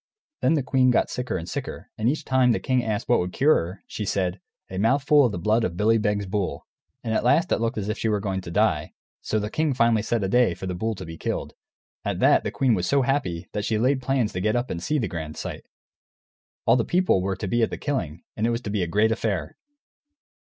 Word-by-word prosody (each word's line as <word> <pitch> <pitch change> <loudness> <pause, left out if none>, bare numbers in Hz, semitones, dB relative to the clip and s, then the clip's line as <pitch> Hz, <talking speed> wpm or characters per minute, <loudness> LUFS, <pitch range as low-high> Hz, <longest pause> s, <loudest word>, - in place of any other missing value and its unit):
Then 160 - +3
the 145 - 0
queen 130 0 +3
got 125 - +2
sicker 125 -4 -2
and 85 -1 -6
sicker, - - -6
and 110 +2 +1
each 150 +2 -2
time 130 -2 +3
the - - -1
king 130 -1 0
asked 110 -3 -2
what - - +4
would 90 0 -2
cure 145 +8 +4
her 90 +4 -2
she 110 - -5
said, 95 -2 -1 0.3
"A 95 - -5
mouthful 140 +6 +4
of - - -4
the 100 - -4
blood 110 +6 +1
of 85 -4 -2
Billy 110 +3 +3
Beg's 105 -1 0
bull." 95 -7 -3 0.4
And 110 - -2
at - - +1
last 160 +8 +3
it - - +2
looked 115 -1 -1
as 100 -2 -2
if 110 +1 -3
she 110 - 0
were 105 -1 +1
going 95 -2 -2
to 90 - -8
die. 85 -5 +1 0.3
So 110 - -1
the 105 0 -2
king 155 -4 0
finally 115 -3 +3
set 115 0 -1
a - - +1
day 115 -3 +3
for 95 - -7
the 90 - -3
bull 110 +5 -2
to - - -8
be 80 0 -8
killed. - - -3 0.5
At - - -2
that - - +4
the - - -1
queen 130 -3 +1
was 90 -4 0
so 140 -1 +3
happy 125 -11 -1
that 105 - -3
she 110 - 0
laid 130 +4 +2
plans 130 -4 0
to 90 - -3
get 110 +2 +1
up 120 +1 -1
and 85 - -4
see 150 - 0
the 115 -7 0
grand 80 -3 -6
sight. - - -6 1.0
All - - +5
the 120 - +2
people 180 - +2
were 95 +1 -1
to 100 - -5
be 120 +5 +1
at 115 - +2
the - - -5
killing, 90 - -3
and 110 +1 0
it - - +1
was 115 0 -1
to 105 - -5
be 105 -2 0
a 90 - 0
great 105 +6 +2
affair. 110 -4 -2
110 Hz, 260 wpm, -24 LUFS, 95-125 Hz, 1.0 s, All